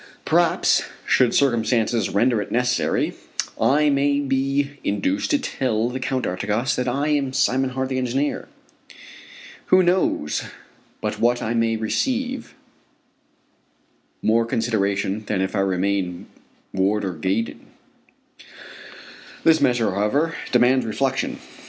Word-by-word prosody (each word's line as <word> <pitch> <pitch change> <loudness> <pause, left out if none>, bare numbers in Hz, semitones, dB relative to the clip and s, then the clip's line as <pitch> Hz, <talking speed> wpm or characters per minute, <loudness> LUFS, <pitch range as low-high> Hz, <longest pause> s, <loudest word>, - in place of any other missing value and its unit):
Perhaps - - +3 0.2
should 125 -2 +3
circumstances 120 -3 +1
render 115 +2 +2
it - - -7
necessary 125 +1 0 0.5
I 150 +2 +3
may 140 +1 +2
be 140 +1 -1
induced 280 - -1
to 290 - +3
tell 120 - -1
the 130 - -4
Count 130 0 -2
d'Artigas 105 +7 -1
that 125 - -2
I 140 +5 0
am 140 -3 0
Simon 135 -1 +1
Hart, 130 +1 -3
the 130 -1 -1
engineer. 130 +3 -1 1.2
Who 185 0 +5
knows 175 - +1 0.6
but - - -3
what 120 +1 +2
I 115 - -1
may 115 -1 +1
receive 250 - -2 1.7
more 115 +1 +3
consideration 100 -3 -1
than 100 - -1
if 95 +2 -1
I - - +1
remain 95 -1 -1 0.5
Warder 95 0 0
Gaydon? 95 +8 -3 1.8
This 160 -1 +4
measure, 120 -4 +2
however, 130 - 0 0.2
demands 125 +1 +4
reflection. 135 +4 -1
125 Hz, 115 wpm, -22 LUFS, 105-135 Hz, 1.8 s, Who